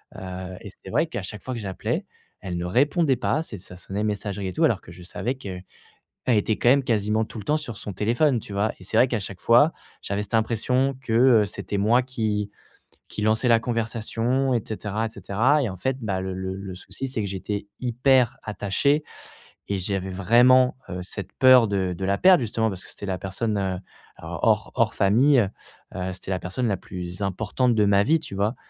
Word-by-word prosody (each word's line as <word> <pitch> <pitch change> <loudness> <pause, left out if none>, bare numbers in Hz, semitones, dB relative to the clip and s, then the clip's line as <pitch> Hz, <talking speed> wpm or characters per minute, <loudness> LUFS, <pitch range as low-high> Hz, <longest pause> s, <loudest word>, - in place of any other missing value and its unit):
Heu 95 0 -7
et - - -8
c'est - - -13
vrai - - +2
qu'à - - -4
chaque 105 +1 -7
fois 130 - -4
que - - -4
j'appelais, 95 -4 -3 0.4
elle 90 -2 -4
ne 85 - -3
répondait 140 - +2
pas. 150 +5 0
C'est 105 - -8
ça 90 0 -11
sonnait, 100 +3 -4
messagerie 100 -2 -2
et - - -4
tout 165 - 0
alors 115 -9 +1
que 85 - -13
je 90 +1 -12
savais 110 +8 -3
qu'elle 95 -7 -7 0.6
était 110 -2 +2
quand 120 - +3
même 135 +1 +5
quasiment 110 -2 +1
tout 110 - -9
le - - -7
temps 150 - +2
sur 120 -8 -6
son 100 - -6
téléphone, 120 - +2
tu 100 - -10
vois? 105 +2 +1
Et - - -12
c'est - - -1
vrai 130 - +6
qu'à 115 -3 -1
chaque 95 -2 -7
fois, 125 +8 +5 0.3
j'avais 100 +1 -2
cette 105 - -12
impression 125 +4 +1
que, 115 -4 -3 0.3
heu, - - -1
c'était 100 0 -5
moi 120 +5 +3
qui 105 -5 -2 0.6
qui 105 - -6
lançait 110 +3 +2
la 115 -1 +6
conversation 115 +3 -1
et 115 - +1
cetera 110 0 -3
et - - -8
cetera 120 +8 +1
et 115 - -1
en 95 - -7
fait, 130 +8 -1
bah, 95 -4 -1
le 95 0 -4
le 95 0 -4
le 95 -1 -7
souci 95 +8 -6
c'est 120 -4 -2
que - - -2
j'étais 100 +2 -4
hyper 125 0 +2
attaché 110 +9 0 0.7
et 100 -1 -1
j'avais 95 0 -2
vraiment, 125 +7 +5
heu, 90 - -4
cette 95 +1 -6
peur 130 -4 +7
de 95 -3 -1
de 95 - -4
la 100 +1 +1
perdre 185 -4 +6
justement 110 0 0
parce 95 -1 -7
que - - -10
c'était 100 - -8
la 95 -2 -2
personne, 105 +4 -2
heu, 95 -2 -1 0.4
hors - - 0
hors - - +2
famille, 125 +7 +4 0.6
heu, 95 0 -3
c'était 95 +1 -6
la 90 - -1
personne 120 +7 -2
la 100 - +1
plus 90 +1 -7
importante 110 +5 0
de 105 - +4
ma 100 0 +4
vie, 160 +2 +3
tu 100 - -8
vois? 105 +5 0
105 Hz, 215 wpm, -24 LUFS, 95-125 Hz, 0.7 s, peur